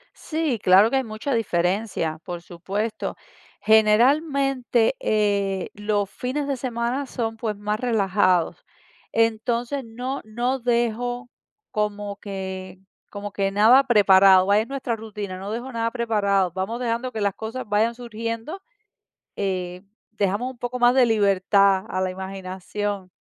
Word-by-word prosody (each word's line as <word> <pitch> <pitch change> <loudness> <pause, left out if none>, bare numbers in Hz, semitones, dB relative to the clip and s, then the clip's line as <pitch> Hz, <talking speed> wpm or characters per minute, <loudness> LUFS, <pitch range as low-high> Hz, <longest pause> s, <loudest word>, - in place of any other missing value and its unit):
Sí, 310 -6 -2
claro 190 +4 +6
que 270 - +1
hay 265 - +1
mucha 220 +5 -4
diferencia, 180 -5 -1
por 175 -2 -6
supuesto. 195 +6 -4 0.5
Generalmente, 250 +3 +3
eh, 200 -3 0
los 205 -1 -1
fines 275 +3 -3
de 280 -1 -1
semana 245 +2 -2
son, 225 -3 -3
pues, 220 -2 -3
más 210 +2 -2
relajados. 195 -7 +1 0.5
Entonces, 235 +4 0
no-no 245 +1 -3
dejo 245 +1 -1 0.4
como 205 -2 -2
que 190 -2 -6 0.3
como 205 0 -6
que 195 -1 -1
nada 225 +7 +6
preparado, 195 -5 +6
vaya, 205 +2 +4
es 225 - -9
nuestra 265 -4 -3
rutina, 210 -3 -6
no 195 +2 -6
dejo 240 +4 -4
nada 230 -2 -1
preparado, 205 -6 +1
vamos 195 +6 -3
dejando 245 +1 -2
que 220 - -4
las 200 -2 0
cosas 225 +2 -6
vayan 215 +3 +2
surgiendo, 230 - -5 0.8
eh, 185 -2 -3 0.3
dejamos 210 +4 -1
un 260 - -16
poco 245 +1 -4
más 245 0 +5
de 260 -1 +5
libertad 200 -2 +3
a 185 - -2
la 185 - 0
imaginación. 190 +1 -5
215 Hz, 135 wpm, -23 LUFS, 195-240 Hz, 0.8 s, claro